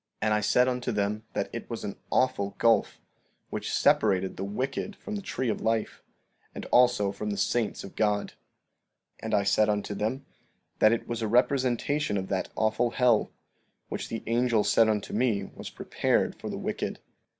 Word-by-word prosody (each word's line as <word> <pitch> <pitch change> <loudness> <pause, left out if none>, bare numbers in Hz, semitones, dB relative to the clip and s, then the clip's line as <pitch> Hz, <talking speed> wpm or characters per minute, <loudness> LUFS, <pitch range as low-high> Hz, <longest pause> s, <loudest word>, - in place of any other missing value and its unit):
15:28 - - +2
And 105 - +3
I 105 - +2
said 125 +4 +3
unto 125 -1 -1
them 105 0 -1
that 100 - -2
it 115 - -6
was 115 - -5
an 100 -1 -4
awful 100 -6 +1
gulf, 115 -1 +2 0.5
which - - -3
separated 95 -3 +2
the 95 - -5
wicked 130 - -3
from 210 - -7
the 205 - -3
tree 130 -9 -3
of 110 - -1
life, 110 -1 -1 0.5
and - - -6
also 120 -5 +4
from 105 +2 -5
the 100 - -2
saints 120 -3 0
of 100 - -10
God. 105 -2 +1
15:29 - - -19 0.9
And - - -4
I 100 - +3
said 105 +2 +3
unto 105 0 -1
them 110 +7 -2 0.5
that 110 - +6
it 115 - -1
was 115 -1 -3
a 110 - 0
representation 130 +1 +1
of 95 0 -4
that 95 -2 -1
awful 110 +2 +1
hell, 120 -2 +3 0.6
which - - -4
the 115 - -4
angel 115 -1 +2
said 115 -1 +4
unto 105 -2 -1
me 110 -3 +1
was - - -8
prepared - - 0
for - - -7
the - - -4
wicked. - - -3
110 Hz, 185 wpm, -28 LUFS, 105-125 Hz, 0.9 s, that